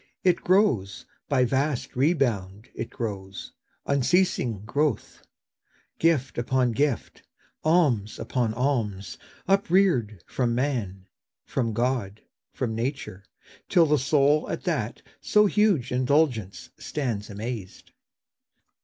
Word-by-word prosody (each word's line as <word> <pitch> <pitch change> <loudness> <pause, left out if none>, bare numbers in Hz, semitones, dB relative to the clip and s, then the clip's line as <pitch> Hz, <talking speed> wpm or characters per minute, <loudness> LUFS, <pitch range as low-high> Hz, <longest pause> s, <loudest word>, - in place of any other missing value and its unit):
It 180 -2 +4
grows— 155 - +1 0.2
By 130 -3 +3
vast 135 +1 -1
rebound 120 - 0
it - - -5
grows, 95 -5 -6 0.3
unceasing 135 - +1
growth; 140 +1 -1 0.8
Gift 145 -7 +1
upon 125 0 +1
gift, 140 +1 -1 0.4
alms 145 - +2
upon 120 -4 -1
alms, 115 - -2 0.3
upreared, 175 - +2
From 120 -2 -1
man, 115 -8 -2 0.4
from 115 -4 -2
God, 115 -3 -1 0.3
from 120 -4 -3
nature, 115 -5 -4 0.5
till 170 -2 +5
the 150 -1 +2
soul 145 +2 +2
At - - -4
that - - -2 0.2
so 210 0 +3
huge 200 - +2
indulgence 125 - 0
stands 120 -8 -3
amazed. 105 -1 -7
125 Hz, 100 wpm, -26 LUFS, 110-150 Hz, 0.8 s, till